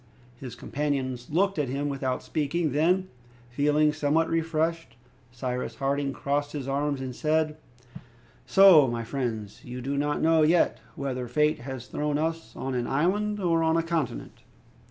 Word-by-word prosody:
His 125 -3 -8
companions 130 -2 -3
looked 195 +2 +1
at 140 -4 0
him 140 +2 -2
without 135 -2 -2
speaking. 155 +1 -1
Then, 180 +7 +2 0.4
feeling 150 +3 +2
somewhat 155 +2 +1
refreshed, 165 0 -1 0.4
Cyrus 125 +1 -4
Harding 140 0 -1
crossed 145 +1 -2
his 140 -3 -4
arms, 140 0 -1
and 130 -2 -5
said, 155 +1 +1 0.9
"So, 190 -8 +7
my 120 -1 -2
friends, 115 -4 -4
you 125 +1 -7
do 135 +3 -3
not 145 0 0
know 160 0 +4
yet 160 +3 +3 0.2
whether 130 -3 -3
fate 150 +5 +1
has 130 -1 -7
thrown 150 +2 -2
us 160 -6 -3
on 135 0 -4
an 120 -1 -1
island, 205 +8 0
or 170 -3 +2
on 160 0 +2
a 165 - +1
continent?" 165 -5 -3
145 Hz, 155 wpm, -27 LUFS, 130-160 Hz, 0.9 s, So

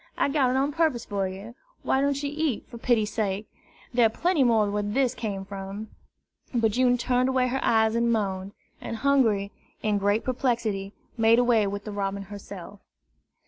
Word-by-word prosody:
I - - +2
got 275 -3 +2
it 255 - 0
on 275 +2 +1
purpose 300 -6 +1
for 200 -2 -1
you. 195 +5 -8 0.3
Why 265 - +2
don't 280 0 0
you 285 - -2
eat, 305 -6 -1
for 235 - -10
pity's 225 -3 +1
sake? 210 -1 -2 0.5
There 240 -1 +5
are - - -3
plenty 330 +5 +1
more 225 -4 +3
where 210 0 0
this 245 +5 +1
came 205 -6 -4
from!" 200 +2 -7 0.7
But 225 -2 +3
June 245 +2 +3
turned 250 +1 +1
away 255 -1 +2
her 265 +2 -2
eyes 220 -1 +3
and 235 0 +2
moaned; 195 -3 -1 0.3
and - - -5
Hungry, 225 -7 +2 0.3
in 210 -1 +1
great 205 +2 +1
perplexity, 230 -6 -1 0.3
made 225 +1 +5
away 240 -4 +3
with 200 0 -4
the 210 - -6
robin 200 -1 -3
herself. 200 -1 -10
225 Hz, 185 wpm, -26 LUFS, 200-255 Hz, 0.7 s, There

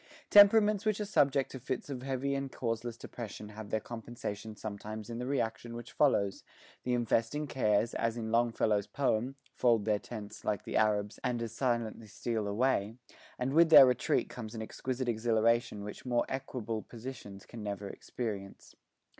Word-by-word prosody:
Temperaments 205 0 +7
which 215 -2 +1
are 210 - -1
subject 140 -9 +2
to 130 - -7
fits 130 +1 -4
of 135 -3 -5
heavy 135 +1 -1
and 135 -1 -3
causeless 115 -1 -3
depression 105 -3 -8
have 105 0 -9
their 110 - 0
compensations 110 -2 -7
sometimes 110 +1 -6
in 115 - -4
the 125 - -3
reaction 120 -3 -2
which 120 0 -8
follows; 100 -9 +2 0.4
the 125 0 0
infesting 120 +5 0
cares, 115 -4 +1
as 115 0 -1
in 110 -1 -3
Longfellow's 115 -3 +2
poem, 130 +2 0 0.2
'fold 115 -4 +3
their 105 -2 +2
tents, 105 -3 -8
like 105 -1 -1
the - - -5
Arabs, 105 -1 +1
and 120 -1 0
as 115 - -4
silently 115 -3 -1
steal 110 0 -2
away,' 110 0 +1 0.4
and 130 +2 -1
with 165 +1 +6
their 145 -4 +11
retreat 125 -1 +1
comes 115 -2 -8
an 110 - -4
exquisite 130 +3 -4
exhilaration 115 -1 +1
which 105 0 -8
more 120 -2 +1
equable 120 -4 -4
dispositions 115 -5 -9
can 115 - -9
never 100 -1 -4
experience. 100 -2 -6
115 Hz, 165 wpm, -32 LUFS, 110-130 Hz, 0.4 s, their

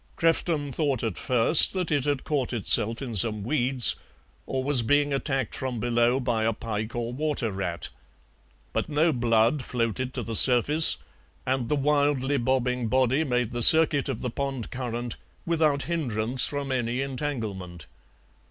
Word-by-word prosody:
Crefton 165 -3 -1
thought 140 -6 -2
at 110 -6 -3
first 125 +5 +4
that 180 -3 -3
it 145 -3 0
had 145 -2 -2
caught 135 -5 -3
itself 115 +2 -1
in 120 -3 -6
some 105 0 +1
weeds, 130 0 +3 0.5
or 130 -1 -3
was 140 -2 +1
being 145 +4 +1
attacked 135 -4 -2
from 130 -3 -4
below 120 +2 0
by 120 -4 -2
a 115 +1 0
pike 110 +1 -6
or 120 0 -4
water 140 -5 -2
rat. 90 -3 -5 0.8
But - - -3
no 155 +2 +1
blood 120 +2 +1
floated 125 +1 -3
to 125 - -3
the 115 0 -6
surface, 135 +7 +6 0.5
and 130 -2 -2
the 150 - +1
wildly 145 -1 0
bobbing 125 -1 -1
body 130 +5 +1
made 125 -4 -2
the 120 0 -4
circuit 160 +1 +5
of - - -5
the 125 - -4
pond 135 -3 -5
current 120 -1 -5 0.3
without 155 -4 +1
hindrance 125 -7 +1
from 140 -1 -4
any 125 0 -2
entanglement. 110 - -6
130 Hz, 155 wpm, -25 LUFS, 115-145 Hz, 0.8 s, surface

